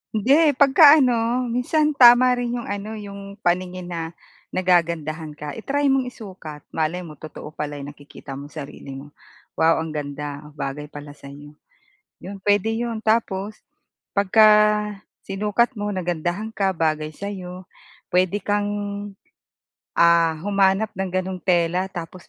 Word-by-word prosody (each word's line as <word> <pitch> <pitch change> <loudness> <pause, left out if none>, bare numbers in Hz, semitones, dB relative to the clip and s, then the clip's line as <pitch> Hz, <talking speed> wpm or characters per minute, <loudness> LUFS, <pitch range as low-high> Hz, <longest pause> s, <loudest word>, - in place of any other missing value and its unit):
Hindi. 280 +7 +4
Pagka 285 +2 +7
ano, 240 0 +1
minsan 300 +6 +1
tama 250 -2 +7
rin 245 -1 -1
'yong 240 - -5
ano 205 +2 -4
'yong 200 -1 -9
paningin 180 0 -1
na 165 0 -5 0.4
nagagandahan 165 -4 0
ka. 150 0 -6
I-try 280 - 0
mong 265 -1 +1
isukat. 185 -11 -10
Malay 165 +3 -2
mo 155 -4 -11
totoo 155 -1 -9
pala 150 -1 -5
yung 145 0 -7
nakikita 145 -1 -13
mong 140 +1 -7
sarili 140 -2 -8
mo. 140 +2 -10 0.5
"Wow, 160 0 +3
ang 160 - -6
ganda. 145 0 -6
Bagay 145 0 -5
pala 145 -1 -10
sa 145 -1 -14
iyo." 145 +1 -11 0.7
'Yon, 195 +1 -9
pwede 205 +2 +2
'yon. 230 0 -3
Tapos, 215 -2 -1 0.5
pagka, 205 +2 +5 0.7
sinukat 210 +5 0
mo 205 0 -2
nagandahan 175 +3 -2
ka 195 -3 0
bagay 155 -2 -1
sa'yo, 185 -1 -7 0.4
pwede 185 +2 +2
kang, 205 0 0 1.3
ah, 170 -1 +4
humanap 200 +1 +2
ng 190 -1 -2
gano'ng 185 0 -2
tela 180 +1 +1
tapos 180 -1 -9
185 Hz, 135 wpm, -22 LUFS, 160-220 Hz, 1.3 s, Pagka